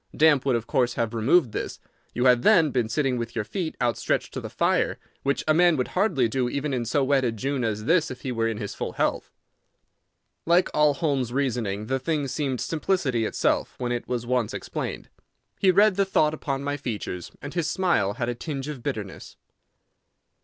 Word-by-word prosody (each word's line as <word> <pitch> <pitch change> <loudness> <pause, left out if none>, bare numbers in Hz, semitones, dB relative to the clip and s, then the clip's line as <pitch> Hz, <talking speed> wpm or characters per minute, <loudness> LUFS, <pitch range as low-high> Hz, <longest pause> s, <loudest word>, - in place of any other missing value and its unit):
Damp 145 -3 +4
would 130 - +3
of 115 -1 -2
course 125 -2 +1
have 115 -1 -1
removed 120 +4 +3
this. - - -4 0.4
You 125 - +1
had, 125 -1 +5
then, 165 - +5
been 120 -4 0
sitting 135 0 0
with 115 0 -5
your 110 -2 -1
feet 160 - -4
outstretched 120 -2 0
to - - -4
the - - -6
fire, - - +1 0.2
which 140 0 0
a 155 - +5
man 175 0 +4
would 125 - -1
hardly 180 - +2
do 125 +1 -1
even 140 +1 -2
in 120 -2 -1
so 135 +5 +1
wet 135 0 +2
a 120 - +1
June 130 +4 -2
as 110 -1 -2
this 165 +1 +3
if 130 -1 -8
he 130 - -3
were 115 -1 0
in 115 -2 -2
his 105 -2 -5
full - - -4
health." - - -1 1.1
Like 175 +2 +3
all 150 -1 +4
Holmes's 140 -6 0
reasoning 120 -6 -1
the 135 +4 -1
thing 145 +1 -1
seemed 135 -2 -2
simplicity 150 - 0
itself - - 0
when 125 -1 -2
it 120 0 -3
was 120 -2 -2
once 125 -3 0
explained. - - -5 0.5
He 195 - +4
read 200 +1 +5
the 200 - +4
thought 155 -5 +2
upon 140 -3 -3
my 145 0 -2
features, 105 - -5
and 145 +2 -8
his 170 -3 -1
smile 170 - +1
had 120 +2 -3
a 120 - -1
tinge 135 +2 -5
of 150 -5 -6
bitterness. - - -6
130 Hz, 205 wpm, -25 LUFS, 120-150 Hz, 1.1 s, had